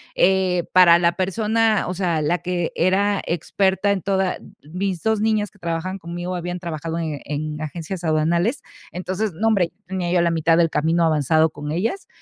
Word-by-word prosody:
Eh, 185 -2 +2
para 175 -2 +7
la 170 0 +2
persona, 215 +3 +1
o 180 - -3
sea, 175 -4 0
la 160 +4 +1
que 175 -2 -2
era 195 +3 +2
experta 190 +3 0
en 200 -2 0
toda 190 -2 0 0.2
mis 180 +3 -3
2 220 -1 +1
niñas 215 -1 +1
que - - -25
trabajaban 170 +2 -3
conmigo, 175 +1 -5
habían 175 0 -4
trabajado 165 -1 -4
en 155 -3 -3
en 150 +1 -4
agencias 165 +4 -5
aduanales, 170 - +1 0.3
entonces, 185 +3 -3
no 210 +8 -1
hombre, 195 -6 +2 0.2
tenía 180 -2 -2
yo 180 -1 +3
la 170 - +2
mitad 165 0 +2
del 165 -1 +3
camino 165 +3 +1
avanzado 160 0 +3
con 150 -1 -7
ellas, 225 - -2
175 Hz, 175 wpm, -22 LUFS, 165-190 Hz, 0.3 s, para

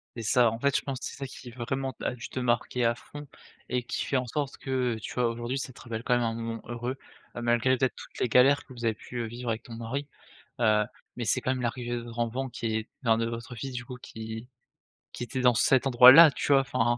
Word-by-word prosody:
C'est 115 - -5
ça, 115 +2 +4
en 115 - -5
fait, 140 +2 +1
je - - -1
pense 135 -2 -4
c'est - - -5
ça 140 - -5
qui 125 -1 -10
vraiment 130 +2 -3
a - - 0
dû 125 - -8
te 130 - -4
marquer 120 0 0
à 115 - +3
fond 145 +4 -11 0.4
et 125 0 0
qui 120 - -3
fait - - -2
en 125 -1 +1
sorte 140 +2 -3
que, 130 -3 0
heu, - - -7
tu - - -6
vois? 125 - +2
Aujourd'hui 120 +3 -3
ça 130 -1 -5
te - - -14
rappelle 115 -1 -5
quand 125 - +1
même 120 - +3
un 115 -1 -1
moment 115 0 -4
heureux. 120 +3 -4 0.4
Heu, 120 - -4
malgré 120 +2 +3
peut-être 130 0 0
toutes - - -11
les 125 - +1
galères 135 +5 +5
que 130 - -14
vous 120 -1 -6
avez 110 - +2
pu, 120 +3 -10
heu, - - -2
vivre 120 +2 -6
avec 115 0 -2
ton 120 - -10
mari, 120 +5 -4 0.5
heu, 110 -2 +4 0.3
mais 120 -2 -3
c'est 130 - +1
quand - - 0
même 130 -1 -1
l'arrivée 120 0 -2
de - - -3
votre 120 0 -10
enfant 125 +3 -1
qui 115 -2 -3
est 110 +1 -2
enfin 115 -2 +3
de 115 - 0
votre 115 +1 -6
fils 130 +3 -6
du 125 0 -5
coup 125 - -8
qui 110 0 -8 0.6
qui - - -6
était 130 +1 -3
dans 125 -1 +5
cet 125 +4 +3
endroit-là 130 +5 +9
tu - - -2
vois? 135 -1 +7
Enfin, 125 -3 0
120 Hz, 265 wpm, -28 LUFS, 115-130 Hz, 0.6 s, endroit-là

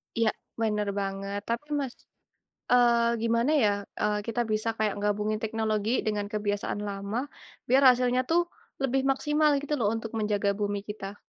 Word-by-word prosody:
Ya 230 -1 +3 0.3
bener 210 -2 0
banget. 195 +1 -3
Tapi 235 +5 -2
Mas, 265 -3 -4 0.8
eee, 235 -1 +4
gimana 230 +3 +2
ya, 235 -9 +4 0.3
eee, 210 0 +1
kita 230 +1 -1
bisa 215 +1 0
kayak 215 -2 0
gabungin 210 +1 0
teknologi, 220 +1 0
dengan 210 -1 0
kebiasaan 205 -1 -2
lama, 205 +7 -3 0.4
biar 265 +3 +5
hasilnya 250 0 +2
tuh 340 +1 +5 0.4
lebih 270 0 +1
maksimal 295 +3 +2
gitu 295 +1 -2
loh 220 -4 +2
untuk 225 0 -4
menjaga 210 -1 +1
bumi 205 -1 -1
kita? 205 -1 -7
220 Hz, 150 wpm, -28 LUFS, 205-245 Hz, 0.8 s, biar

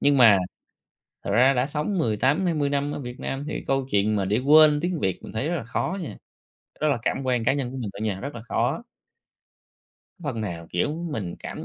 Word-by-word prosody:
Nhưng 145 0 +4
mà 115 -6 +7 0.9
thật - - -3
ra 125 +6 +5
đã 125 0 +1
sống 150 +7 -2
18-20 145 - +1
năm 145 +1 0
ở - - -4
Việt 125 -2 -7
Nam 135 +2 -4
thì - - -4
câu 135 -1 0
chuyện 105 +1 +2
mà 100 -2 0
để 105 +5 +1
quên 150 +2 +6
tiếng 175 -1 -1
Việt 95 -7 -1
mình - - -9
thấy 130 +8 -1
rất 175 - 0
là 140 - -3
khó 130 +10 -2
nha. 160 - -6 0.6
Đó 155 - +3
là 140 - +2
cảm 135 - -1
quan 125 -2 +1
cá 130 - +4
nhân 135 -3 -2
của 135 - -6
mình 115 -5 -4
thôi - - -8
nha. 105 -3 -1
Rất 140 +1 -5
là 115 - -7
khó. 135 - 0 1.4
Phần 130 -7 -3
nào, 85 -5 -5
kiểu, 90 - 0 0.2
mình 100 -10 -4
cảm - - -7
130 Hz, 220 wpm, -25 LUFS, 110-145 Hz, 1.4 s, mà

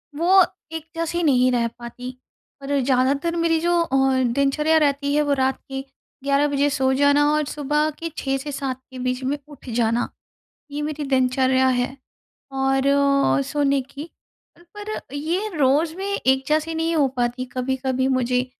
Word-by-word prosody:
वो 365 +5 +5 0.3
एक 320 -1 -5
जैसी 335 +1 -2
नहीं 255 -4 +4
रह 235 -1 +1
पाती। 250 +2 -8 0.4
पर 280 0 -1
ज़्यादातर 275 +6 +1
मेरी 330 -1 +2
जो 345 +1 +2
अ, 265 -3 +2
दिनचर्या 280 +6 +2
रहती 285 -1 +1
है 300 - +3
वो 290 -1 +1
रात 265 -1 0
के 270 0 -4 0.4
11 280 +1 +2
बजे 285 0 +1
सो 265 -2 +1
जाना 285 +1 +4
और 305 0 +2
सुबह 295 +2 0
के 330 0 -4
6 270 0 -1
से 290 +2 -6
7 265 -2 -4
के 255 - -8
बीच 255 +1 -2
में 280 +3 -1
उठ 285 -3 -12
जाना। 230 0 0 0.6
ये 290 +1 -4
मेरी 300 0 -3
दिनचर्या 260 0 +2
है। 250 +1 0 0.6
और 270 0 +1
अ, 275 - +3
सोने 280 - +1
की, 280 +5 -9 0.5
पर 415 +5 -7
ये 340 +9 -2
रोज़ 295 +4 +2
भी 395 +1 -3
एक 265 0 +3
जैसी 310 +2 0
नहीं 325 +1 0
हो 285 -3 +4
पाती। 245 +1 -1
कभी-कभी 260 0 -1
मुझे 250 -1 +1
275 Hz, 165 wpm, -22 LUFS, 260-300 Hz, 0.6 s, वो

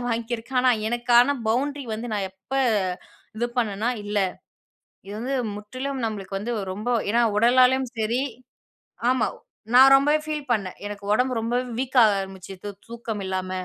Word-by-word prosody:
அடிலாம் 245 - -4
வாங்கியிருக்கேன். 235 +2 -1
ஆனா, 255 - +5 0.2
எனக்கான 240 +3 +4
பவுண்ட்ரி 280 +4 0
வந்து, 230 +2 -5
நான் 195 -2 -1
எப்ப, 190 +7 -17 0.9
இது 240 - +1
பண்ணனா 215 0 0 0.2
இல்ல. 205 0 -1 0.9
இது 200 - -7
வந்து 265 +3 -2 0.2
முற்றிலும் 255 +6 -5
நம்மளுக்கு 200 -3 -4
வந்து 225 +5 -3 0.2
ரொம்ப 215 +5 -5 0.2
ஏன்னா 235 +2 +3 0.2
உடலாலேயும் 255 +3 +4
சரி 225 +3 0 0.9
ஆமா. 255 -3 +2 0.5
நான் 265 +2 +9
ரொம்பவே 295 +3 +4
ஃபீல் 300 -2 -4
பண்ணேன். 195 -5 -2
எனக்கு 205 -1 -7
ஒடம்பு 255 +3 +2
ரொம்ப 230 +2 -1 0.2
வீக்காக 245 -5 +4
ஆரம்பிச்சுது, 190 +1 -8 0.2
தூக்கம் 230 -2 -5
இல்லாம. 185 0 -3
235 Hz, 140 wpm, -24 LUFS, 210-255 Hz, 0.9 s, நான்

